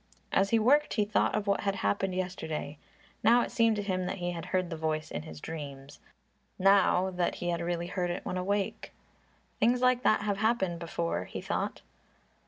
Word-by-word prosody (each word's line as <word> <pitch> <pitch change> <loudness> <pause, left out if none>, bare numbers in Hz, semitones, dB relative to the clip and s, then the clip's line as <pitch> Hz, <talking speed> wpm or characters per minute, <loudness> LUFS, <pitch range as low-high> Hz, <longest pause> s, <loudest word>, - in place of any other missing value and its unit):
As 195 +1 +3
he 230 - +4
worked 280 +7 +3
he 210 - +2
thought 210 0 +1
of 215 -1 -1
what 200 -1 +1
had 200 -2 0
happened 180 - 0
yesterday. 160 -5 -4 0.4
Now 235 +2 +6
it - - -5
seemed 230 -2 +3
to 205 - -2
him 185 -2 -1
that 195 - -3
he 175 -1 -2
had 170 -1 -6
heard 185 -1 -1
the - - -2
voice 155 -1 -2
in - - -3
his 75 0 -10
dreams, 140 - -8 0.6
now 190 -1 +4
that 180 -1 -1
he 175 - -3
had 170 0 -1
really 170 0 -2
heard 180 0 -2
it 175 - -4
when - - -3
awake. 195 +2 -2 0.7
"Things 245 +2 +3
like 250 0 +3
that 215 -4 +3
have 205 -1 -1
happened 195 -5 +1
before," 170 - -2
he - - -6
thought. - - -3
185 Hz, 195 wpm, -30 LUFS, 170-205 Hz, 0.7 s, Now